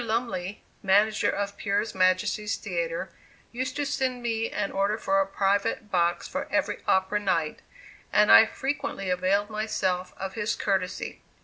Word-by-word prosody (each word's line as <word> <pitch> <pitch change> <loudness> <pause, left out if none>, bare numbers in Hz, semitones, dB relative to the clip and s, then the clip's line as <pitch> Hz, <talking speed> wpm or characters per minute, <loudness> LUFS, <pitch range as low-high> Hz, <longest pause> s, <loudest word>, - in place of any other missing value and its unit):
Lumley, 215 -4 -3 0.2
manager 210 +2 +3
of 200 0 -2
Pier 200 +2 0
Majesty's 185 +3 +1
Theatre, - - -3 0.4
used 255 +2 -3
to 290 0 -1
send 255 -3 -1
me 225 -1 -1
an 205 -1 -2
order 200 +2 0
for 195 -3 +2
a 195 - 0
private 200 +2 0
box 175 -1 +1
for - - -4
every - - 0
opera 190 +2 +2
night, 170 -6 0 0.5
and 210 0 +5
I 220 - +9
frequently 265 -10 -3
availed 195 +4 +1
myself 185 -4 -1
of 190 0 -5
his 210 -1 -1
courtesy. 190 -2 -2
205 Hz, 145 wpm, -27 LUFS, 190-220 Hz, 0.5 s, I